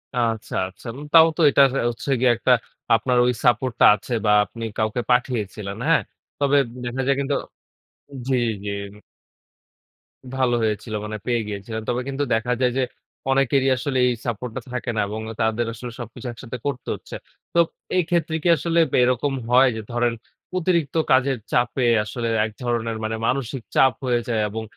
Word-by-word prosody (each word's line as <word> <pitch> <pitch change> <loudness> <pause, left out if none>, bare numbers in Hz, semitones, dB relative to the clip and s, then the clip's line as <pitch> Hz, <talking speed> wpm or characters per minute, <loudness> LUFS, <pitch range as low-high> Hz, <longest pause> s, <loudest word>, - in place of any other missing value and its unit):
আচ্ছা, 115 -3 -1
আচ্ছা। 95 +6 -13
উম 145 - -8
তাও 165 -1 +9
তো - - +1
এটার 140 0 +5 0.2
হচ্ছে 120 +4 -6
গিয়ে 125 -1 +4
একটা 125 - +1 0.4
আপনার 125 +2 +1
ওই 125 - +2
সাপোর্ট 120 +1 +3
টা - - +7
আছে 115 +4 -6
বা 105 - +4
আপনি 115 +5 -9
কাউকে 110 +3 0
পাঠিয়েছিলেন, 110 -5 -1
হ্যাঁ? 165 - +4 0.4
তবে 145 0 +3 0.3
দেখা 125 +2 -3
যায় 140 - +3
কিন্তু 140 0 0 0.9
জি, 130 - +2 0.3
জি। - - -2 1.7
ভালো 130 -2 +2
হয়েছিল 110 0 -2
মানে 110 0 -4
পেয়ে 120 -1 +1
গিয়েছিল। 105 +2 -6
তবে 125 +1 0
কিন্তু 140 +1 -2
দেখা 115 +2 +1
যায় 125 -1 +3
যে, 135 - +2 0.5
অনেকেরই 135 0 +3
আসলে 130 +1 -2
এই 125 - +2
সাপোর্ট 120 0 -3
টা 130 - -3
থাকে 125 0 -2
না, 105 - +1
এবং 110 +2 -5 0.2
তাদের 110 +1 +1
আসলে 120 +2 -7
সবকিছু 120 +2 -7
একসাথে 120 +1 -8
করতে 130 -3 -4
হচ্ছে। - - -10 0.4
তো 170 - +3 0.4
এই 180 - +3
ক্ষেত্রে 170 -2 0
কি - - +1
আসলে 170 +3 +1 0.2
এরকম 125 +3 +1 0.2
হয় 130 +2 +6
যে 110 - -4
ধরেন 120 0 +1 0.4
অতিরিক্ত 170 -5 0 0.2
কাজের 130 0 +3
চাপে 125 +1 +1 0.2
আসলে 115 +3 -4 0.2
এক 110 - -5
ধরনের 115 -2 -1
মানে 110 +1 -2
মানসিক 130 0 -1
চাপ 130 -2 +5
হয়ে 120 -1 +2
যায়, 110 -2 +1
এবং 110 +2 -5
125 Hz, 170 wpm, -23 LUFS, 115-135 Hz, 1.7 s, তাও